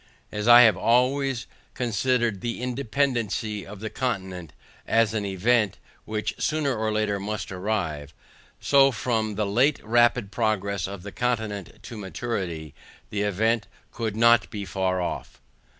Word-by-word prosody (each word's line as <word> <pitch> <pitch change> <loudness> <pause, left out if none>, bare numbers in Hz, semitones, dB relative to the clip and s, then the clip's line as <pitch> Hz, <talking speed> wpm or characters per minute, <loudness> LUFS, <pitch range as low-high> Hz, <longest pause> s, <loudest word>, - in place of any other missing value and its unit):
As 105 +1 -3
I 120 0 +10
have 110 -5 +6
always 125 +3 +2 0.3
considered 120 -3 0
the 120 -1 -3
independancy 120 -4 -1
of 95 +3 -10
this 110 - -4
continent, 95 - -3 0.4
as 115 -2 +3
an 105 -2 -1
event, 105 +2 +1 0.3
which 110 0 -2
sooner 150 -4 0
or 110 0 -1
later 105 -2 0
must 105 +1 -4
arrive, 90 -7 -3 0.5
so 135 -1 +5
from 110 -3 -1
the 105 - 0
late 125 +9 +2
rapid 120 -1 +3
progress 100 -4 -1
of 100 -2 -8
the 100 - -7
continent 110 -6 -3
to 115 - -8
maturity, 90 - -4 0.4
the 105 - -1
event 105 +1 +1 0.2
could 110 -3 -3
not 115 +1 +5
be 100 -2 -5
far 95 -1 -1
off. 90 - -4
110 Hz, 140 wpm, -25 LUFS, 100-120 Hz, 0.5 s, I